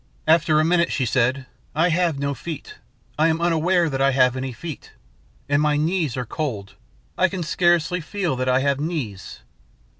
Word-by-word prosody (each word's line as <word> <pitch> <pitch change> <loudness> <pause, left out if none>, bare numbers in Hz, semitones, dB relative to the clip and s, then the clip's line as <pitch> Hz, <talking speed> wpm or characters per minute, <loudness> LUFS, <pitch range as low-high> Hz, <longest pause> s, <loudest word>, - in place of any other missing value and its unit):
"After 160 -1 +4
a 155 - +3
minute 170 0 +2
she 130 - 0
said, 130 +2 +1 0.3
'I 165 +4 +3
have 170 -3 +1
no 140 0 -1
feet. 155 +4 -8 0.4
I 160 - +5
am 160 0 +1
unaware 170 +1 +2
that 135 -3 -2
I 135 0 +3
have 125 -1 +3
any 130 0 -3
feet. 155 +4 -9 0.5
And 145 +1 +2
my 150 -1 +2
knees 155 -4 0
are 125 - -2
cold. 110 -7 -4 0.5
I 185 - +5
can 185 -2 -4
scarcely 175 +1 +1
feel 175 -2 -2
that 130 0 -1
I 130 +1 +3
have 140 0 +1
knees.' 125 - -5
150 Hz, 180 wpm, -22 LUFS, 130-170 Hz, 0.5 s, I